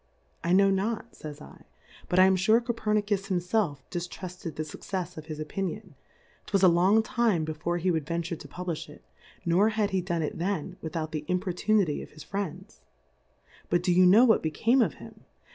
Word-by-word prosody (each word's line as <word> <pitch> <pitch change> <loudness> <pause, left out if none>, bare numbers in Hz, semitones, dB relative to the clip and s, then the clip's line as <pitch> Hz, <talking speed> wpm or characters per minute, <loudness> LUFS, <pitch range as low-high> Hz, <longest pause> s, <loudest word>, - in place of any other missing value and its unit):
I 170 - 0
knov/ 195 +1 +5
not, 220 +4 -2
flfys 150 -1 -10 0.2
/, - - -23
but 180 - 0
I 185 - +8
am 190 0 +4
fure 215 +5 +4
Col'crmuis 210 -4 -1
himfelif 180 -5 0
di 175 - -1
ftruRed 180 -1 -7
the 155 - -2
Succefs 180 +4 -5
of 155 0 -9
his 155 -2 -6
Opinion, 195 +4 -4 0.5
'twas 195 -2 +1
a - - +9
long 185 +6 +4
time 220 -8 +1
before 155 +2 -2
he 180 +2 +1
would 160 -4 -2
ven 170 +1 -1
ture 170 +1 -4
to 145 - -11
publifii 175 +1 -5
it, - - -15 0.4
nor 180 +6 +4
had 215 -2 0
he 190 -1 +1
done 170 -2 -2
it 150 - -4
then, 185 0 -2
without 160 -1 -4
the 155 -1 -3
Importunity 180 -1 +1
of - - -10
liis 155 -1 -13
Friends. 195 0 -5 0.9
But 175 0 +2
do 180 -1 +2
you 180 +1 +6
know 215 +7 +7
what 225 - +4
be 160 - -1
came 230 - +2
of - - +1
him? - - -13
180 Hz, 195 wpm, -28 LUFS, 165-205 Hz, 0.9 s, a